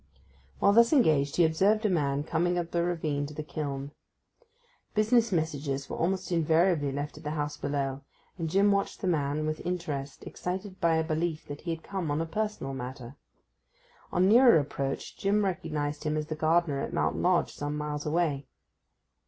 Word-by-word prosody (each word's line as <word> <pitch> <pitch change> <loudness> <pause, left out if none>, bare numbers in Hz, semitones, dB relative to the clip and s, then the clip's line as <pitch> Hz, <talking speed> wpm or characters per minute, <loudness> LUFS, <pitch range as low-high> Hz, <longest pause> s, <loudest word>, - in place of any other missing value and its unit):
While 200 - +4
thus 235 +1 +6
engaged 155 - +3
he 175 - +5
observed 200 +7 +2
a - - +4
man 145 -4 +1
coming 175 +3 0
up 170 -1 -2
the 170 - +1
ravine 155 -5 -1
to 150 - -10
the 155 - -4
kiln. 140 -2 -4 1.0
Business 225 +1 +3
messages 145 -5 -1
were - - -2
almost 185 +2 -1
invariably 165 -2 +2
left 145 +2 -5
at - - -15
the 150 - -3
house 145 0 -2
below, 140 -2 -2 0.3
and 165 -3 -3
Jim 200 +4 +4
watched 200 0 -1
the 190 - -1
man 150 -2 0
with 155 0 -1
the - - -12
interest 150 -6 -4
excited 185 +2 -5
by 165 -2 +3
a 160 - +2
belief 160 0 -2
that 145 0 -7
he 175 - -6
had 160 - -16
come 190 -5 -3
on 145 +1 0
a 165 - 0
personal 210 -5 -3
matter. 125 0 -7 1.0
On 185 +1 +3
nearer 235 0 +7
approach 140 -2 -3
Jim 205 +1 +2
recognized 155 -6 -2
him 155 -1 0
as 155 - -2
the 155 - -4
gardener 155 -2 +2
at - - -4
Mount - - 0
Lodge 180 -1 +2
some 145 +1 -4
miles 150 0 -3
away. 150 -3 0
160 Hz, 185 wpm, -29 LUFS, 145-180 Hz, 1.0 s, nearer